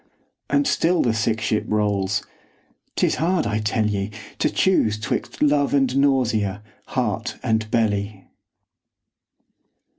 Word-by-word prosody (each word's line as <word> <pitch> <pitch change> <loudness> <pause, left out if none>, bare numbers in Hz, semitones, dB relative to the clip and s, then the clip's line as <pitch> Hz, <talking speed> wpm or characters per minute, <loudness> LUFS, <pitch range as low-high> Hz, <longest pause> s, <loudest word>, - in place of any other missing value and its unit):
And 285 - +2
still 175 -8 +2
the 120 - +1
sick 110 0 0
ship 105 0 0
rolls. 100 -2 0 0.7
'Tis - - +1
hard, 175 +1 +1
I 105 -1 -1
tell 110 +1 0
ye, 100 -1 -1 0.3
To - - +2
choose 110 - +2
'twixt 125 +5 -3
love 145 -1 +3
and 135 -2 +2
nausea, 115 -8 +1 0.2
heart - - -2
and 110 -1 0
belly. 100 -3 -1
110 Hz, 120 wpm, -22 LUFS, 105-140 Hz, 0.7 s, love